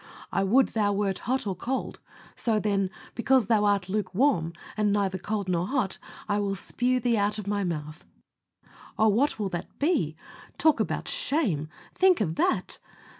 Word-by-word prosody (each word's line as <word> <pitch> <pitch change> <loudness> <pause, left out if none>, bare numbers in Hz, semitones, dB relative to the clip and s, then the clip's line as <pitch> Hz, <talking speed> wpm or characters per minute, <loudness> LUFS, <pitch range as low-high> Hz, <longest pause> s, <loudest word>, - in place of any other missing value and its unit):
"I 195 - +1
would 240 +7 +4
thou 205 -2 +1
wert 195 -2 -1
cold 260 +3 0
or 195 -2 -2
hot. 260 +2 -3 0.4
So, 225 -3 +1
then, 200 -2 0 0.2
because 255 0 +3
thou 215 -1 +3
art 200 -3 +2
lukewarm, 195 - +1 0.2
and 210 -1 +1
neither 195 -2 0
cold 205 +1 -3
nor 175 0 0
hot, 250 -6 -1 0.3
I 205 0 +1
will 200 -1 -1
spue 250 +6 0
thee 235 -1 +1
out 205 +1 +1
of 210 - -5
My 205 0 -1
mouth." 155 -3 -4 0.9
Oh! 220 0 +4
what 250 +8 +2
will 205 -3 -2
that 175 -1 -6
be? 280 - +1 0.4
Talk 315 -2 +4
about - - -2
shame! 190 - 0 0.2
Think 375 -1 +4
of 175 -7 0
that! 185 +2 0
205 Hz, 170 wpm, -27 LUFS, 190-240 Hz, 0.9 s, would